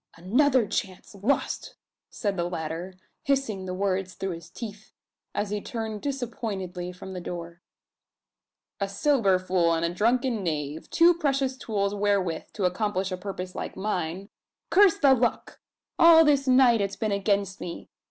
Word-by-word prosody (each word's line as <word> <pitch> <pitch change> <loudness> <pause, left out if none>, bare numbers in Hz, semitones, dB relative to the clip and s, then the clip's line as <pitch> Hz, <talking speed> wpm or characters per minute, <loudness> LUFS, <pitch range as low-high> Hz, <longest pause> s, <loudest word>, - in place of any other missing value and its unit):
"Another 250 - +3
chance 190 -2 -4
lost!" 205 +8 -1 0.3
said 205 -3 -2
the 175 -1 -1
latter, 165 +2 -5 0.3
hissing 240 -9 -1
the 185 - -3
words 190 -1 -1
through 195 0 -3
his 170 0 -8
teeth, 215 +1 -9 0.4
as 205 -1 -1
he 210 0 -2
turned 220 -4 -5
disappointedly 215 -10 -4
from 185 +1 -9
the 180 - -5
door. 170 -1 -7 1.2
"A 200 -1 -1
sober 200 -3 +2
fool 180 -2 +1
and 165 +1 0
a 170 - -2
drunken 235 +3 +1
knave 150 -2 -3
two 340 +1 +6
precious 275 -5 0
tools 205 -5 -2
wherewith, 200 -5 0
to 200 - -1
accomplish 195 0 -1
a - - -1
purpose 185 -1 -6
like - - -6
mine! 190 -1 -3 0.4
Curse 395 -2 +6
the 275 -2 +5
luck! 240 -2 -1 0.4
All 330 -1 +8
this 285 -2 +3
night 255 -3 +5
it's 200 0 -2
been 215 +1 -2
against 200 -1 0
me! 170 - -7
200 Hz, 150 wpm, -26 LUFS, 180-240 Hz, 1.2 s, All